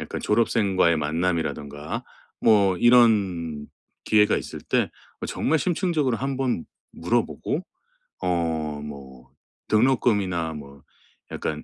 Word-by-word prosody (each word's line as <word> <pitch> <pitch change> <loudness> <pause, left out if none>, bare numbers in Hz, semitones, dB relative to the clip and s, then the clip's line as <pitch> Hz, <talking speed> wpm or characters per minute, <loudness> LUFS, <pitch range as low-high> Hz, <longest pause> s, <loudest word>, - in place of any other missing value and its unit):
약간 - - -5
졸업생과의 100 -6 +2
만남이라든가, 75 -2 -2 0.4
뭐 100 -4 +4
이런 95 -11 +3 0.4
기회가 105 -1 +4
있을 - - -6
때 - - 0 0.3
어 - - -4
정말 160 +2 0
심층적으로 165 -8 0
한번 130 -7 -1 0.3
물어보고 160 - -1 0.6
어 80 -4 -1
뭐 65 -3 -10 0.4
등록금이나 105 -8 +2
뭐 70 -2 -11 0.5
약간 75 -1 -4
90 Hz, 235 characters per minute, -24 LUFS, 75-115 Hz, 0.6 s, 뭐